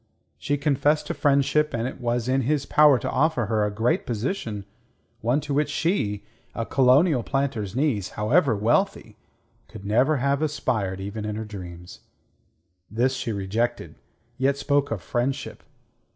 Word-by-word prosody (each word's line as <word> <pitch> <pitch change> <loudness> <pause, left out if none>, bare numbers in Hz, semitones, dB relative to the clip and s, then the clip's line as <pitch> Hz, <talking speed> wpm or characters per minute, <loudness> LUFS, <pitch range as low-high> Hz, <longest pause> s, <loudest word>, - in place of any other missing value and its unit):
She 145 - -1
confessed 145 +1 +1
to - - -3
friendship, 145 +1 +2
and 115 +1 -1
it 130 - -8
was 120 0 -1
in 130 +1 +2
his 140 +2 0
power 150 -3 +5
to - - -3
offer 145 -4 +1
her 105 0 0
a 105 - +1
great 110 +4 0
position, 110 - -3 0.5
one 120 +6 +1
to 145 -1 -4
which 145 +1 +1
she, 145 - -1 0.3
a 115 - -2
colonial 135 +3 +4
planter's 125 -6 -2
niece, 130 -9 0
however 120 +4 +3
wealthy, 115 - 0 0.5
could 100 - -11
never 125 +9 +3
have 140 +2 0
aspired 110 -11 -1
even 100 +2 -5
in 105 0 -3
her 110 +1 -4
dreams. 90 -4 -9 0.9
This 120 +6 +1
she 130 -3 -3
rejected, 110 +4 -2 0.5
yet 135 +1 +2
spoke 140 0 +1
of 100 -7 -4
friendship. 125 +7 -2
125 Hz, 150 wpm, -24 LUFS, 105-145 Hz, 0.9 s, power